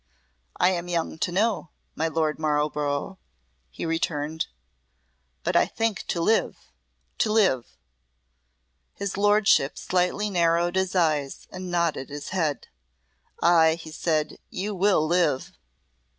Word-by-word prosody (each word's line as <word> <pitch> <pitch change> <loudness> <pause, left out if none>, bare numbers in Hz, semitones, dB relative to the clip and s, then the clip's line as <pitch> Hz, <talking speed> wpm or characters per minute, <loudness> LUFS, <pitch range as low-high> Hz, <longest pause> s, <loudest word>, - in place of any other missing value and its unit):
"I 180 - +4
am 175 -1 -3
young 165 -2 -2
to 175 - 0
know, 200 -2 0 0.2
my 160 - -1
Lord 155 -1 -1
Marlborough," 150 +2 -1 0.5
he - - -6
returned, 160 -1 -1 1.0
"but - - -1
I - - +5
think 225 -3 -2
to 170 - -1
live 220 +7 +2 0.6
to 215 - +2
live." 190 - +2 1.2
His 200 -1 -4
Lordship 205 -6 +3
slightly 185 +3 0
narrowed 170 0 +2
his 190 0 0
eyes, 155 -6 0
and 185 0 -6
nodded 170 -6 0
his 145 0 -7
head. 160 -6 -1 0.8
"Ay," 165 -2 +5
he 165 -1 -10
said, 155 -1 -1
"you 205 +3 -3
will 190 -4 +3
live!" 170 -5 +1
170 Hz, 120 wpm, -25 LUFS, 155-190 Hz, 1.2 s, I